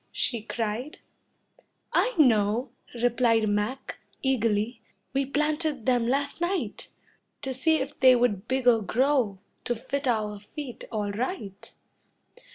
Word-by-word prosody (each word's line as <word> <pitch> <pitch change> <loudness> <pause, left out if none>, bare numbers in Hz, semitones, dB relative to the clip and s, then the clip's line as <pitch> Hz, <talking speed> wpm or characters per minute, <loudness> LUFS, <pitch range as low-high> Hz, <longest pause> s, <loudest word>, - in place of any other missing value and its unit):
she 235 -3 0
cried. 225 +5 -3 1.0
"I - - +2
know," 230 -3 +3 0.2
replied 235 -2 +2
Mac, 210 +6 -2 0.2
eagerly, 230 -3 +1 0.3
"We 270 0 +1
planted 300 -2 -1
them 245 -3 +2
last 280 +5 -1
night, 360 +2 -2 0.6
To 265 - -2
see 320 +5 +3
if 280 -1 -3
they 255 -1 +7
would 230 -4 +1
bigger 250 -3 +3
grow 245 -2 +1 0.3
To 240 - 0
fit 270 +4 -3
our 210 -3 0
feet 250 +5 -8
all 210 -2 -1
right." 210 - -5
245 Hz, 120 wpm, -27 LUFS, 220-275 Hz, 1.0 s, they